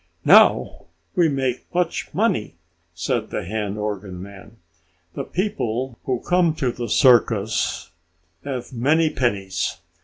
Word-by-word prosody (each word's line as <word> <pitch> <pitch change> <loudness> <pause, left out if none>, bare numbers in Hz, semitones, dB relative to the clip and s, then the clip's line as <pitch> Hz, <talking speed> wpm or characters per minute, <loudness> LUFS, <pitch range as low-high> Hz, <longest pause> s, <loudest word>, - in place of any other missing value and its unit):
"Now - - +5 0.3
we 170 -2 +4
make 130 -3 -2
much 180 0 -1
money!" - - 0 0.4
said - - -2
the - - -4
hand 105 +1 -3
organ 100 -3 -4
man. 100 +3 -12 0.6
"The - - -4
people 130 - -2
who 125 -2 -1
come 175 -3 +2
to 130 -5 -1
the 120 -1 -5
circus 115 -7 +2 0.5
have 130 -2 -5
many 155 +6 +2
pennies. 100 -9 -1
120 Hz, 120 wpm, -22 LUFS, 105-145 Hz, 0.6 s, Now